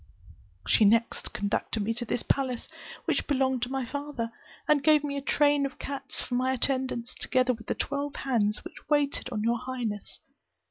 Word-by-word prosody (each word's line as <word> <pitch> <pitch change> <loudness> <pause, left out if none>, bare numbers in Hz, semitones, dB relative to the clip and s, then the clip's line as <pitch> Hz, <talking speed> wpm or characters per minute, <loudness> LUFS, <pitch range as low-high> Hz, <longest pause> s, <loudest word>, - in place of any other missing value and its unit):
She - - +5
next 230 +3 +3
conducted 205 +1 -1
me 225 +3 0
to 240 +1 -3
this 240 - -1
palace, 260 -3 0 0.4
which - - 0
belonged 265 -3 +2
to 245 - -1
my 270 -2 -1
father, 280 -3 -4 0.4
and 295 -2 +4
gave 305 -2 +5
me 285 -1 -2
a 280 - -2
train 290 0 +3
of 275 - -3
cats 275 -1 -4
for - - -3
my 255 +1 +2
attendants, 255 -2 0
together 255 -1 +1
with 225 -1 -11
the - - 0
twelve 285 0 -2
hands 215 -6 0
which - - -11
waited 290 -3 +1
on 215 -4 -2
your 235 +1 +2
highness. 235 -5 -4
255 Hz, 180 wpm, -28 LUFS, 230-280 Hz, 0.4 s, She